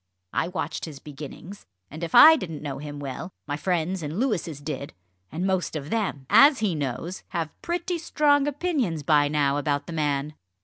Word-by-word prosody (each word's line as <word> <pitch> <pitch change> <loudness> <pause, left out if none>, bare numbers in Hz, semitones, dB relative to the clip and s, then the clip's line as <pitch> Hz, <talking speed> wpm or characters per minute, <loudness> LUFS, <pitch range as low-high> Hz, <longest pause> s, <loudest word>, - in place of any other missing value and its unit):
I - - +1
watched 175 -3 -4
his 155 -4 -9
beginnings, 150 +7 -10 0.2
and 155 +4 -7
if 165 - -2
I 320 +1 +10
didn't 165 - -6
know 140 -3 -4
him 145 0 -7
well, 135 +4 -5 0.2
my 145 - -3
friends 175 +2 -1
and 155 +5 -4
Louis's 190 - -1
did. 140 -3 -5 0.4
And 165 +6 -2
most 185 -4 0
of 150 0 -5
them 200 -12 -1
as 270 - +7
he 210 -5 0
knows! 145 +4 -4
have 165 -4 -3
pretty 345 0 -2
strong 290 -3 +2
opinions 280 - -1
by 150 -2 +4
now 145 -1 +1
about 145 0 -1
the 170 - -7
man." 150 -1 -1
165 Hz, 180 wpm, -25 LUFS, 145-210 Hz, 0.4 s, I